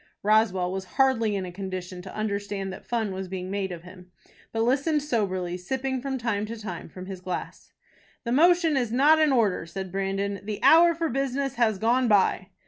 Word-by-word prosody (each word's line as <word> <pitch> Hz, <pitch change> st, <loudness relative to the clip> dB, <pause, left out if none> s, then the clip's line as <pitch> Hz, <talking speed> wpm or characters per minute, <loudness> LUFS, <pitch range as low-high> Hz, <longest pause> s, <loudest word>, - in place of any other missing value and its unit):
Roswell 200 Hz, -4 st, +2 dB
was 190 Hz, 0 st, -4 dB
hardly 230 Hz, -6 st, +3 dB
in 190 Hz, -2 st, -2 dB
a 180 Hz, -, -7 dB
condition 185 Hz, -1 st, -6 dB
to 185 Hz, +1 st, -10 dB
understand 200 Hz, -2 st, -3 dB
that -, -, -12 dB
fun 225 Hz, -4 st, -1 dB
was 190 Hz, 0 st, -5 dB
being 185 Hz, 0 st, -5 dB
made 195 Hz, -1 st, -2 dB
of 170 Hz, -1 st, -7 dB
him, 180 Hz, 0 st, -14 dB, 0.4 s
but 225 Hz, 0 st, 0 dB
listened 280 Hz, +5 st, +1 dB
soberly, 185 Hz, -9 st, -1 dB
sipping 260 Hz, +7 st, -3 dB
from 270 Hz, 0 st, -3 dB
time 230 Hz, -4 st, -1 dB
to 230 Hz, +1 st, -6 dB
time 185 Hz, -7 st, -7 dB
from 185 Hz, +2 st, -9 dB
his 190 Hz, -1 st, -8 dB
glass. 185 Hz, 0 st, -6 dB, 0.5 s
"The 235 Hz, -, -3 dB
motion 335 Hz, +3 st, +4 dB
is 245 Hz, -4 st, 0 dB
not 290 Hz, +6 st, +5 dB
in 310 Hz, -2 st, +4 dB
order," 215 Hz, -9 st, +1 dB
said 190 Hz, +2 st, -6 dB
Brandon. 195 Hz, +1 st, -2 dB
"The 210 Hz, 0 st, -4 dB
hour 335 Hz, +5 st, +7 dB
for 330 Hz, 0 st, -1 dB
business 275 Hz, 0 st, -1 dB
has 230 Hz, -5 st, +1 dB
gone 240 Hz, +5 st, +2 dB
by." 195 Hz, -3 st, +3 dB
210 Hz, 195 wpm, -26 LUFS, 190-260 Hz, 0.5 s, hour